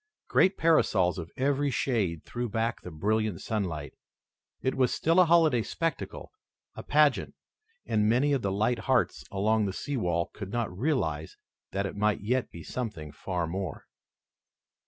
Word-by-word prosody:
Great 190 +1 +3
parasols 95 - +3
of 85 -1 -6
every 140 +2 +1
shade 105 - 0
threw 120 -1 -3
back 115 +2 -1
the - - -8
brilliant 105 +3 0
sunlight. 85 -10 -3 0.7
It 130 - +1
was 130 -2 +2
still 165 +3 +2
a 180 - +7
holiday 160 -7 +5
spectacle, 165 +8 -3 0.4
a - - -7
pageant, - - +2 0.5
and 105 0 +2
many 135 +5 +3
of 135 - +1
the 100 - -1
light 110 +5 +1
hearts 130 -2 +2
along 105 +2 +1
the 95 - -3
sea 140 +7 -3
wall 85 -5 0
could 100 -2 -7
not 115 -6 -2
realize 90 - -1 0.3
that 100 0 -1
it 95 - -4
might 105 0 +1
yet 125 +5 0
be 85 - -10
something 105 -12 -5
far 90 +3 -3
more. 90 -1 -5
110 Hz, 155 wpm, -28 LUFS, 90-130 Hz, 0.7 s, a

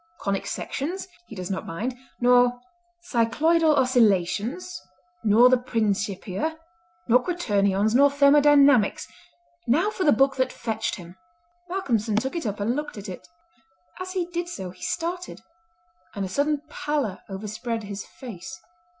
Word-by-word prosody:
"Conic 195 -1 -2
Sections 355 +8 -4 0.2
he 225 - -10
does 185 -1 -5
not 190 - -4
mind, 230 +10 -3 0.2
nor 245 0 +4 0.4
Cycloidal 310 +4 +2
Oscillations, 245 - +1 0.4
nor 225 +3 +6
the 255 0 +4
Principia, 215 - -2 0.5
nor 250 +1 +5
Quaternions, 205 - +1
nor 280 +3 +6
Thermodynamics. 280 -4 +5 0.6
Now 335 - +2
for 380 - -3
the 295 - +5
book 270 +4 +3
that 260 - +1
fetched 220 -1 -3
him!" 175 -1 -12 0.5
Malcolmson 235 - -1
took 260 +8 -1
it 330 -8 -2
up 205 0 -4
and 220 +5 0
looked 295 -5 -5
at 200 -1 -7
it. 180 - -9 0.7
As 370 0 -5
he 365 -2 -1
did 345 0 -4
so 190 - -6
he 180 - -19
started, 350 +2 -4 0.7
and 200 -1 -2
a - - -6
sudden 290 +7 0
pallor 290 -10 -2
overspread 215 +4 -4
his 200 0 -6
face. 190 - -10
245 Hz, 140 wpm, -25 LUFS, 205-295 Hz, 0.7 s, nor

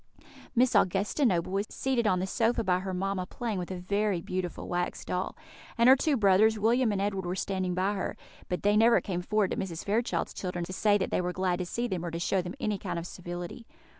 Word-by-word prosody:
Miss 245 +1 +4
Augusta 200 - +2
Noble 175 -3 0
was 200 +2 -1
seated 255 -4 0
on 185 - +3
the 185 - -1
sofa 230 +4 +1
by 180 -2 +2
her 190 0 -4
mamma, 185 0 -2
playing 225 -3 -3
with 175 - -5
a 185 - -4
very 200 +1 0
beautiful 180 +1 -4
wax 175 0 -2
doll; - - -3 0.4
and 235 +1 +5
her 260 - +9
two 280 +1 +1
brothers, 215 +1 +4
William 230 +2 +3
and 200 - -1
Edward, 195 -1 -1
were 180 - -2
standing 185 -2 -2
by 190 +3 +1
her; 195 - -3 0.3
but 180 - -2
they 205 +1 +4
never 230 +2 +6
came 180 -3 -3
forward 210 +1 +1
to - - -2
Mrs. 175 -4 -4
Fairchild's 225 +4 0
children 180 -2 -3
to 185 - -7
say 205 +2 +3
that 190 - -2
they - - +1
were 180 0 -1
glad 185 -1 0
to 180 - -3
see 235 +6 -2
them, 185 -6 -3
or 175 - -2
to 165 - -4
show 185 +2 +1
them 180 +5 -6
any 215 -6 -1
kind 180 -3 -4
of 170 - -4
civility. 175 +5 -7
195 Hz, 235 wpm, -29 LUFS, 180-215 Hz, 0.4 s, her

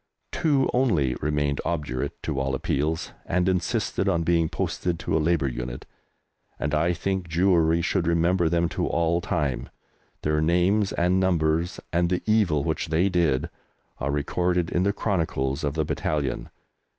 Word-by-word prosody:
Two 145 -5 +2
only 90 - +2
remained 75 -1 0
obdurate 75 -7 -3
to 70 - -2
all 65 0 -1
appeals, 75 +4 -1
and 90 +1 0
insisted 95 +1 0
on 85 -3 +1
being 85 -1 +2
posted 90 -2 -2
to - - -2
a - - +3
Labour 80 -3 +2
unit, 60 -1 -5 0.7
and 70 +1 -2
I 80 +3 +2
think 95 +1 -2
Jewry 85 -1 +3
should 90 -2 0
remember 85 +1 +2
them 85 0 +2
to - - -2
all 85 +1 +1
time. 65 -7 -2 0.5
Their 75 0 +1
names 90 +5 +2
and 90 +2 +2
numbers, 85 -2 +1
and 85 0 +2
the 90 0 -1
evil 100 -10 +2
which 80 +1 -2
they 80 +5 +2
did, 85 -8 +1 0.5
are 70 - -2
recorded 85 +4 0
in 90 - +1
the 100 +2 +2
chronicles 80 -9 -1
of 70 0 -1
the 80 -1 0
battalion. 75 -2 -2
85 Hz, 155 wpm, -25 LUFS, 75-90 Hz, 0.7 s, a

